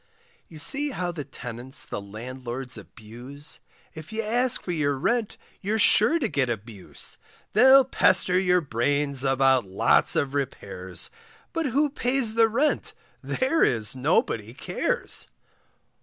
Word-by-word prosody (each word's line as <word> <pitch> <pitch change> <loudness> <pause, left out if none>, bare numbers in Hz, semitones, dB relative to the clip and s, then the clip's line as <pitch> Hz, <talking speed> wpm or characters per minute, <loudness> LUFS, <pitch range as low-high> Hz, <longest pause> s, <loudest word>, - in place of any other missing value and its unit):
You 160 - -12
see 285 - +3
how 180 -9 -3
the 160 -4 -6
tenants 130 0 -5
the - - -5
landlords 125 +4 -6
abuse, 120 +6 -8 0.3
If 160 +5 -10
you 220 +1 -2
ask 240 +3 0
for 180 - -4
your 145 -4 0
rent 230 - -1 0.2
you're 210 +3 -1
sure 215 - +5
to 275 -8 -1
get 140 - 0
abuse; 110 -3 -6 0.3
They'll 265 +4 +7
pester 185 -7 +3
your 180 -1 +3
brains 140 +1 0
about 135 -3 +3
lots 95 - +3
of 140 -1 0
repairs, 100 -9 -4 0.4
But 330 -3 0
who 285 +3 +1
pays 250 -4 0
the 225 0 +5
rent, 270 +7 0 0.3
there 265 +6 +1
is 115 0 +1
nobody 125 -5 0
cares. - - -1
145 Hz, 135 wpm, -25 LUFS, -, 0.4 s, They'll